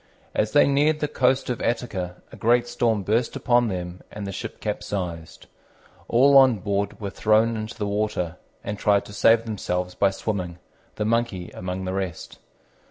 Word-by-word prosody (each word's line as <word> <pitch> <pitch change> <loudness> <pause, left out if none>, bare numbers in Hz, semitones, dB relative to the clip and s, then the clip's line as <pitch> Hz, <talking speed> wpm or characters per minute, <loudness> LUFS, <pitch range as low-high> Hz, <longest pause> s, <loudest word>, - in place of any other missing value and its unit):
As 105 0 0
they 145 - +6
neared 145 +2 +2
the 150 - 0
coast 130 -2 +1
of 120 - -4
Attica 100 -7 -2 0.2
a - - -10
great 120 +1 +2
storm 115 -4 0
burst 115 +4 0
upon 120 -1 +2
them, 90 -2 -5
and 105 -1 -6
the 100 - -4
ship 110 +3 -6
capsized. 90 -6 -4 0.6
All 135 +3 +6
on 130 -4 +5
board 100 +2 -2
were 100 -3 -4
thrown 110 +3 +2
into 110 +1 -5
the 105 - -2
water, 100 -4 -2 0.3
and 105 0 -4
tried 100 -1 +3
to 105 - -11
save 115 +2 +4
themselves 90 -4 -3
by 100 - +3
swimming, 95 -3 -4 0.4
the 105 - -2
Monkey 110 -6 -1
among 90 +1 -5
the 95 - -3
rest. 95 -3 -5
105 Hz, 170 wpm, -24 LUFS, 95-120 Hz, 0.6 s, they